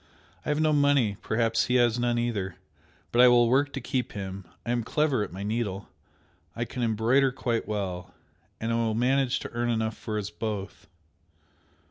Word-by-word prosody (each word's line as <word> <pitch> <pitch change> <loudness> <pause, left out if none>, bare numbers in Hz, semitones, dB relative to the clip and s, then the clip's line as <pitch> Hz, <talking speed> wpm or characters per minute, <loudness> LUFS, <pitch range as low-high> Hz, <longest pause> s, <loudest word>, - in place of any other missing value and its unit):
I - - -5
have 150 0 +1
no 155 -1 +3
money, 140 -8 +3
perhaps 115 0 +1
he 125 - 0
has 120 -1 +3
none 120 0 +1
either, 105 -6 -2 0.6
but 120 - +4
I 125 - +9
will 120 -1 +6
work 140 +4 +2
to 135 - -3
keep 130 -2 -2
him, 95 -1 -6 0.2
I 120 - -1
am 120 -1 0
clever 145 0 +1
at - - -6
my 95 +3 -6
needle 105 -2 -3 0.7
I 120 - -2
can 125 +2 -6
embroider 120 +4 +3
quite 120 -3 -2
well 95 -4 -3 0.5
and 115 +1 -2
I - - +1
will 115 -2 0
manage 130 +2 +2
to - - -7
earn 120 0 -1
enough 110 -1 0
for 110 -1 -4
us 105 -1 -4
both." 105 -2 -5
115 Hz, 185 wpm, -27 LUFS, 105-125 Hz, 0.7 s, I